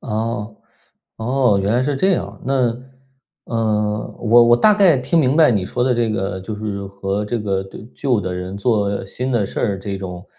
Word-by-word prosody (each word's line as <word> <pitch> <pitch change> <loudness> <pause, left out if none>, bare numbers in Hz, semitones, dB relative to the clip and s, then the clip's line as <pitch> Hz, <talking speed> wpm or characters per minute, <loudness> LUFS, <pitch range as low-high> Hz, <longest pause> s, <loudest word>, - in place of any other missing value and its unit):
哦， 110 0 -3 0.6
哦。 125 -2 +1
原 100 +3 0
来 125 +2 +2
是 140 0 -1
这 190 +7 +2
样。 - - -3
那 125 -3 +1 0.7
呃， 105 -2 -1
我 120 +1 +5
我 120 0 +5
大 210 - +5
概 190 -8 +5
听 135 +6 0
明 135 0 +2
白 160 -4 +6
你 100 -5 0
说 120 - -2
的 125 -1 +2
这 115 -2 0
个 95 -2 -3
就 105 +3 -6
是 100 -2 -5
和 100 +1 -3
这 115 +3 -2
个 100 -3 -1
对， 95 +2 -11
旧 125 -6 0
的 90 -1 -4
人 90 +2 -5
做 100 -3 0
新 125 +6 -4
的 110 -4 +1
事 - - -5
儿， 100 -4 0
这 100 +1 -5
种， 90 -1 -7
110 Hz, 215 characters per minute, -19 LUFS, 100-125 Hz, 0.7 s, 白